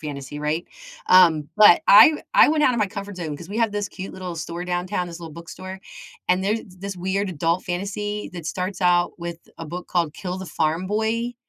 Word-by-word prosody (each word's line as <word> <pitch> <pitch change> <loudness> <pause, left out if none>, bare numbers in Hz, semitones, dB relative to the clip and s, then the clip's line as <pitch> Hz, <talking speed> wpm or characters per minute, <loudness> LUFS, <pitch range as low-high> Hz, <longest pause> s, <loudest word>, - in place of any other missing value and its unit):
fantasy, 145 -1 -7
right? 150 +3 -2 0.4
Um, 165 -5 +5
but 210 -5 +7
I 205 - +10
w 300 - -6
I - - +7
went 305 -1 +2
outta 250 - +3
my 210 - +2
comfort 200 0 -7
zone 160 -4 -4
'cause 170 +4 -11
we 210 - -4
have 225 -3 +1
this 205 0 -2
cute 190 - -8
little 180 -2 -6
store 170 +2 -5
downtown, 180 +1 -2
this 170 0 -9
little 165 -2 -8
bookstore, 185 +4 -9 0.5
and 180 +1 +2
there's 215 +3 0 0.2
this 195 0 -6
weird 190 +2 -1
adult 165 +2 -1
fantasy 205 +3 -4
that 170 -3 -7
starts 185 +3 -4
out 175 -1 +3
with 170 -1 -6 0.2
a 165 - -6
book 175 +3 -7
called 170 -4 -1
Kill 180 0 -5
the 190 - -7
Farm 165 +2 -1
Boy, 220 +4 -1
180 Hz, 210 wpm, -23 LUFS, 170-200 Hz, 0.5 s, I